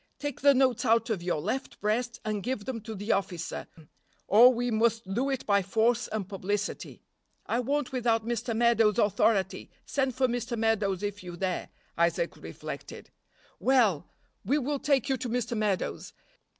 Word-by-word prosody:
Take 290 -2 -5
the 280 0 +6
notes 255 -3 +2
out 230 -1 +2
of 200 -5 -1
your 175 -3 -1
left 220 - -4
breast 235 +3 -1
and 215 -1 -1
give 230 -2 -3
them 245 -4 -4
to 220 +1 -7
the 205 +3 -2
officer, 185 -3 -2 0.6
or 235 +5 +8
we 245 0 -1
must 225 -3 +1
do 255 +6 0
it 270 -2 -2
by 200 -1 +3
force 225 +5 +1
and 215 -4 -4
publicity." 200 +1 -4 0.4
"I 235 - 0
won't 280 +2 -1
without 230 -3 +1
Mr. 235 0 -2
Meadows' 230 -3 +4
authority. 205 -2 +1 0.2
Send 265 -3 -1
for 260 0 +2
Mr. 240 0 -3
Meadows 210 -4 +1
if 205 0 -3
you 175 -1 -8
dare." 185 0 -2 0.3
Isaac 170 0 +1
reflected. - - -8 0.5
"Well! 225 - +3 0.4
we 265 +9 +2
will 285 0 -1
take 275 -2 +1
you 265 -2 +1
to 250 - -4
Mr. 235 0 -1
Meadows. 210 -4 -2
225 Hz, 165 wpm, -28 LUFS, 205-250 Hz, 0.6 s, or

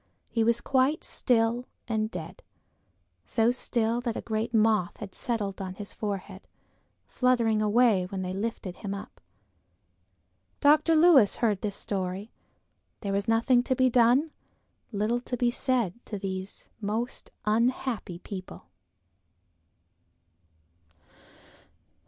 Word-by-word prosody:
He 230 - +1
was 235 +1 +2
quite 270 +3 +2
still 235 0 +1 0.2
and 220 -2 0
dead, 175 -6 -8 0.8
so 225 - +2
still 235 -2 -1
that 235 -2 -2
a - - -3
great 220 +1 -2
moth 215 -5 +2
had 205 -3 -8
settled 205 -5 -3
on 185 -1 -5
his 205 0 -8
forehead, 200 -2 -5 0.6
fluttering 235 -4 +2
away 215 -3 +3
when 190 0 -4
they 185 0 -3
lifted 195 -3 -4
him 200 -2 -4
up. 200 - -10 1.4
Dr. 305 +3 +5
Lewis 310 - +6
heard 215 -5 0
this 205 -2 -2
story. 195 +2 -4 0.7
There 200 -2 -2
was 200 +2 -1
nothing 230 +2 +4
to 260 +1 0
be 255 0 +3
done; 250 +6 +4 0.6
little 215 +3 0
to 245 0 -5
be 240 0 +2
said 240 -4 -1
to 210 - -4
these 190 0 -6
most 220 +5 -3 0.2
unhappy 230 -3 0
people. 185 - -9
225 Hz, 120 wpm, -28 LUFS, 200-245 Hz, 1.4 s, Lewis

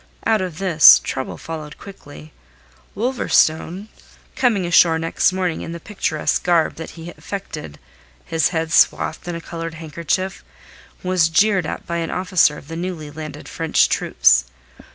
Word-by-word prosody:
Out 220 -3 +2
of 180 -4 -5
this, 175 -5 +7
trouble 130 -1 -4
followed 155 -2 -8
quickly. 75 - -13 0.6
Wolverstone 195 -5 +1 0.5
coming 220 -8 +1
ashore 170 -1 +4
next 165 +3 +1
morning 185 -3 -2
in 165 - -6
the 170 - -7
picturesque 170 -6 -2
garb 170 -3 +2
that 165 - -7
he 165 +1 -8
affected, 165 - -8 0.5
his 160 -2 +1
head 165 -2 -3
swathed - - +2
in 175 - -4
a 170 - -6
coloured 165 -1 -7
handkerchief, 170 +4 -3 0.6
was 180 -3 +2
jeered 190 0 +2
at - - -6
by 170 - -3
an 165 -1 -3
officer 180 -5 +2
of - - -13
the 165 - -7
newly 165 -3 -5
landed 155 0 -9
French - - +1
troops. - - +3
165 Hz, 150 wpm, -20 LUFS, 155-185 Hz, 0.6 s, this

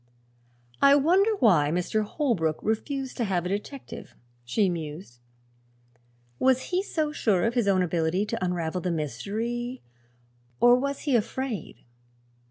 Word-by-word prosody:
"I 280 0 +7
wonder 370 +9 +3
why 180 - +4
Mr. 180 +6 0
Holbrook 210 - 0
refused 265 +4 -2
to 240 - 0
have 180 -3 -1
a - - -2
detective?" 210 +7 -6 0.3
she 190 - +1
mused. 155 -6 -6 1.2
"Was 260 +3 +2
he 365 - +3
so 315 -6 -2
sure 200 -11 +1
of 230 - 0
his 240 -4 +1
own 190 -2 +3
ability 170 +3 0
to 205 - -3
unravel 175 -1 -2
the 180 - -2
mystery, 220 - -3 0.8
or 245 0 +7
was 280 +2 -2
he 285 -5 +1
afraid?" 235 - -3
215 Hz, 135 wpm, -26 LUFS, 175-260 Hz, 1.2 s, I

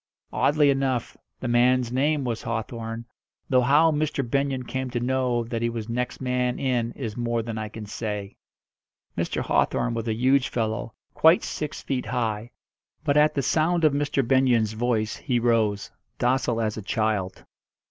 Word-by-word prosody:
Oddly 145 -1 +3
enough, 135 -3 -1 0.3
the 130 - -2
man's 120 0 +3
name 145 +3 +1
was 120 -3 -2
Hawthorn, 115 0 -4 0.5
though 130 -1 +5
how 145 +6 +5
Mr. 150 -3 -1
Benyon 135 0 0
came 130 +1 -3
to 120 -1 -2
know 125 -1 0
that 115 0 -4
he 115 - +1
was 115 -2 -5
next 125 +1 -2
man 125 -1 0
in 120 -3 0
is 115 -6 -5
more 120 -1 -1
than 110 -1 -4
I 110 -1 -4
can 110 0 -8
say. 105 -1 -5 0.8
Mr. - - -1
Hawthorn 120 - +1
was 115 0 -3
a 110 - 0
huge 130 +3 +3
fellow 110 -1 -2 0.2
quite 160 +3 +5
six 150 -1 -5
feet 130 -5 -2
high; 115 -2 -2 0.5
but 145 -2 +1
at 150 0 +4
the 140 - 0
sound 165 +5 +1
of 155 -2 +5
Mr. 140 -3 0
Benyon's 120 -4 +3
voice 110 -1 -1
he 125 -2 0
rose, 110 -4 +1 0.3
docile 125 -1 +1
as 110 -1 -1
a - - -4
child. 105 -3 -1
120 Hz, 170 wpm, -25 LUFS, 115-135 Hz, 0.8 s, though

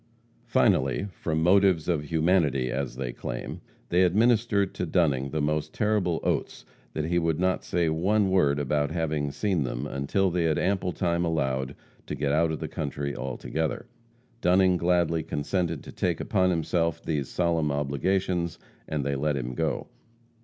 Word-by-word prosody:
Finally, 65 +8 +2
from 80 -3 -2
motives 95 -2 +4
of 80 -4 0
humanity, 80 -5 +2
as 65 -1 -3
they 60 -2 -4
claim, - - -6 0.3
they 90 +1 +3
administered 105 +1 +3
to - - -3
Dunning 75 -6 +1
the 75 +1 -2
most 75 0 -1
terrible 105 -6 +1
oaths - - -2 0.3
that 75 - -2
he 85 +2 +1
would 80 -2 0
not 95 0 +1
say 85 -2 0
one 95 +5 +2
word 75 -7 +3
about 75 +1 0
having 80 -3 -1
seen 95 0 0
them 60 0 -3
until 75 +8 0
they 85 -1 +1
had 80 -2 +2
ample 95 -2 0
time 85 -1 0
allowed 65 -5 -1 0.3
to - - -3
get 70 - -1
out 80 +2 +2
of 80 - -3
the - - -4
country 70 -1 -4
altogether. 75 +4 -3 0.6
Dunning 90 +1 +4
gladly 85 -2 +2
consented 80 +2 -2
to - - -9
take 85 -3 -1
upon 95 -3 +1
himself 85 -1 0
these 75 -4 -2
solemn 85 -4 +1
obligations, 85 +5 -1 0.3
and 75 -3 -2
they 70 0 0
let 75 +1 0
him 65 -1 -4
go. - - -1
80 Hz, 160 wpm, -27 LUFS, 70-90 Hz, 0.6 s, motives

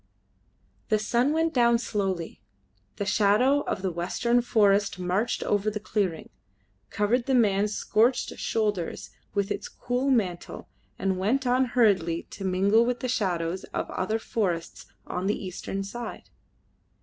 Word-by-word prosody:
The 215 - +4
sun 235 +6 +1
went 325 +1 +1
down 235 -2 +4
slowly. 195 - -3 0.5
The 200 - -3
shadow 215 +7 +3
of 185 - -2
the 190 - 0
western 210 +8 +1
forest 205 -4 +2
marched 185 +6 -1
over 205 +1 +1
the 210 0 -4
clearing, 195 -6 -2 0.6
covered 235 +4 0
the 265 - +3
man's 210 -3 +2
scorched 235 +4 +2
shoulders 210 -6 -2 0.2
with 200 0 0
its 200 0 -3
cool 250 +2 -2
mantle, 190 -9 -1 0.3
and 190 -1 -1
went 250 +8 +1
on 250 +1 +3
hurriedly 185 -8 +3
to 195 - -8
mingle 195 +4 +3
with 245 +1 -1
the 255 - -1
shadows 180 -5 -1
of - - -2
other 215 +4 -1
forests 185 -7 -3 0.2
on 180 +2 -3
the 205 - +1
eastern 195 +1 -5
side. 235 +4 -7
210 Hz, 140 wpm, -27 LUFS, 190-235 Hz, 0.6 s, The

